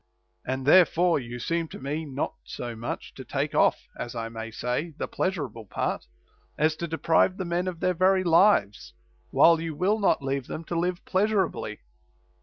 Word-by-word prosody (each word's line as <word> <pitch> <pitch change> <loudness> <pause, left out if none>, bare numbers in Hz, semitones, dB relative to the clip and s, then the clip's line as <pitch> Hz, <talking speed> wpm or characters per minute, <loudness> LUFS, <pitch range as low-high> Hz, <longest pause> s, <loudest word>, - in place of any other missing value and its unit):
And 130 +1 -2
therefore 175 +1 +5
you 120 -1 -7
seem 165 +6 -1
to - - -10
me 150 +4 -3
not 140 -1 -3
so 120 -1 -6
much 115 +2 -6
to - - -9
take - - -2
off - - +2
(as 120 - -6
I 115 -1 -3
may 115 0 -6
say) 125 +8 -3
the - - -3
pleasurable 135 - -3
part, - - -3 0.5
as 155 +1 +2
to 170 - -3
deprive 165 +3 +2
the 185 - -3
men 175 +2 -1
of 175 -2 -5
their 185 - +2
very 185 +2 +3
lives, 165 - +3 0.4
while 165 -1 +5
you 165 -2 -4
will 200 +7 +1
not 195 -8 +2
leave 135 -1 -2
them 160 - -5
to 170 - -5
live 180 +1 -2
pleasurably. 195 -1 0
165 Hz, 180 wpm, -26 LUFS, 130-180 Hz, 0.5 s, therefore